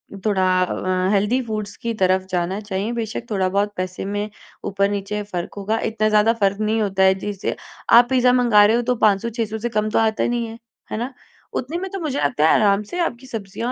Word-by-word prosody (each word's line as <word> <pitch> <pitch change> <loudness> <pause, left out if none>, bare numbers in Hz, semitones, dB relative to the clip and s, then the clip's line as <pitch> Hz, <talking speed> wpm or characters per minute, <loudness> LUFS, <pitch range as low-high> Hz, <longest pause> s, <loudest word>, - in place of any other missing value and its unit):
अ, - - -9
थोड़ा 190 -3 +2 0.2
अ, 185 0 -1
healthy 210 +6 +2
foods 215 -2 -4
की 230 0 -1
तरफ़ 185 0 +3
जाना 180 +2 -1
चाहिए। 205 +1 -3
बेशक 230 0 -4
थोड़ा-बहुत 200 +1 0
पैसे 185 +1 -4
में 205 +1 -3 0.4
ऊपर 200 0 +1
नीचे 205 +1 -3
फ़र्क 175 -1 -4
होगा 210 +3 -1
इतना 215 -1 +1
ज़्यादा 215 +1 +4
फ़र्क 200 0 +2
नहीं 220 +1 +1
होता 195 -2 +1
है 190 0 +5
जिससे 205 -2 -3 0.4
आप 240 0 +3
पिज़्ज़ा 250 -1 +4
मंगा 235 -5 +5
रहे 220 +2 +4
हो 240 - +2
तो - - +2
500-600 220 +2 0
से 240 +2 -2
कम 215 -1 0
तो - - +2
आता 220 -1 +1
नहीं 240 -1 -1
है, 225 0 -9 0.3
है - - -2
ना? 245 +4 -4 0.4
उतने 280 +7 -3
में 380 +1 -4
तो 390 - -4
मुझे 295 -5 -2
लगता 150 +2 +2
है - - +6
आराम 205 -1 +3
से 355 - -2
आपकी 250 -3 -6
सब्जियाँ 225 0 -4
210 Hz, 215 wpm, -21 LUFS, 195-230 Hz, 0.4 s, है